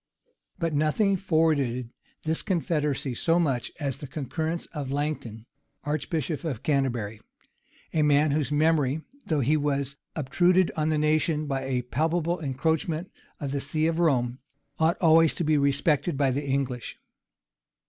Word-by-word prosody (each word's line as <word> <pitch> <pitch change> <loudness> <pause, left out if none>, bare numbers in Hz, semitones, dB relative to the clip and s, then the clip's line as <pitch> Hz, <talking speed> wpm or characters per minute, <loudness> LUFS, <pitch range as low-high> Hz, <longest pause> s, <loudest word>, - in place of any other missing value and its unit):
But 165 -1 -1
nothing 155 +7 +2
forwarded 155 -10 +1 0.3
this 160 0 +1
confederacy 150 -7 -1
so 165 +7 +2
much 135 -8 0
as 140 -5 -3
the 145 - -7
concurrence 160 +4 -3
of 145 -4 -4
Langton, 140 -6 -3 0.4
archbishop 150 +1 -2
of 135 -7 -4
Canterbury; 120 -7 -1 0.7
a 160 - +2
man 150 0 +4
whose 150 0 0
memory, 150 -1 +2 0.2
though 155 -3 +1
he 140 +5 +3
was 140 -2 -1 0.2
obtruded 175 +5 +3
on 155 0 0
the 155 - +1
nation 155 0 +1
by 135 -2 -2
a 130 -2 -1
palpable 165 +6 0
encroachment 160 +4 -1 0.3
of 140 -3 -3
the 140 - -1
see 155 +3 0
of 165 0 0
Rome, 130 -6 +1 0.4
ought 160 +1 +3
always 165 -1 +5
to - - -1
be 155 -1 +2
respected 140 +2 +1
by 135 -2 +2
the 140 +2 -2
English. 135 -3 -2
150 Hz, 145 wpm, -27 LUFS, 135-160 Hz, 0.7 s, always